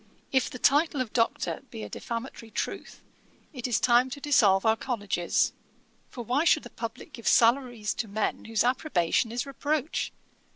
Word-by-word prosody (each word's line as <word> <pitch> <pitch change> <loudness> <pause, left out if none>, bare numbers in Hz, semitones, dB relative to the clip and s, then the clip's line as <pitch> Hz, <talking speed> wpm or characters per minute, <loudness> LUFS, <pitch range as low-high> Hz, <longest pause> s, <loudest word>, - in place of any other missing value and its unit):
If 265 -1 +2
the - - -7
title 290 +3 +3
of 250 -4 -3
Doctor 230 -8 0
be 110 - -7
a 105 - -7
defamatory 230 - -6
truth, - - -5 0.5
it 250 -3 -4
is 235 -5 +1
time 245 +1 +4
to 280 +2 -6
dissolve 215 -10 +4
our 220 0 +5
colleges; 205 -7 0 0.6
for 240 - -7
why 260 +7 +1
should 320 -2 +4
the 240 - -11
publick 230 0 -7
give 230 - -7
salaries 235 -3 +3
to 225 - -9
men 210 +1 -2
whose 225 -1 +1
approbation 240 - +1
is 245 +3 -2
reproach? 290 +2 -2
240 Hz, 165 wpm, -27 LUFS, 220-265 Hz, 0.6 s, our